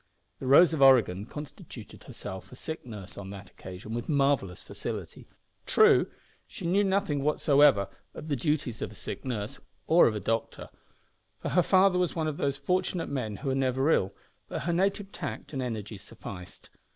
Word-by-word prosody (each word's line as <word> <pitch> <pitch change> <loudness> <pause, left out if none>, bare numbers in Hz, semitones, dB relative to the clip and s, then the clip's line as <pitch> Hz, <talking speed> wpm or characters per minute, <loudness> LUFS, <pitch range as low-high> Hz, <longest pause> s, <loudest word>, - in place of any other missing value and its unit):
The 130 - -5
Rose 160 +5 +7
of 155 - -1
Oregon 115 -7 +5
constituted 150 +3 -10
herself 95 0 -8
a - - -10
sick 160 +1 -6
nurse 105 -5 -9
on 95 -1 -7
that 100 0 -10
occasion 95 +4 -9
with 120 0 -4
marvellous 135 - +1
facility. - - -6 0.4
True, - - +5 0.4
she - - -8
knew 190 +4 +3
nothing 190 -7 +1
whatever 145 -7 +4 0.3
about 155 - -8
the 145 - 0
duties 135 -4 -1
of - - -3
a - - -13
sick - - -6
nurse 110 -5 -4 0.3
or 170 +2 +6
a 110 -2 -1
doctor, 115 +3 -2 0.7
for - - -3
her 180 - +4
father 185 0 +4
was 180 -2 0
one 160 -2 -1
of 155 -2 -2
those 140 -1 0
fortunate 180 0 -1
men 120 -7 -3
who 135 +5 -3
are - - +1
never 135 +2 +1
ill, 95 -8 +2 0.4
but - - -4
her 170 +2 0
native 195 +2 0
tact 150 -7 -6
and 135 - -2
energy 110 -4 -4
sufficed. 90 -2 -10
135 Hz, 175 wpm, -28 LUFS, 105-160 Hz, 0.7 s, Rose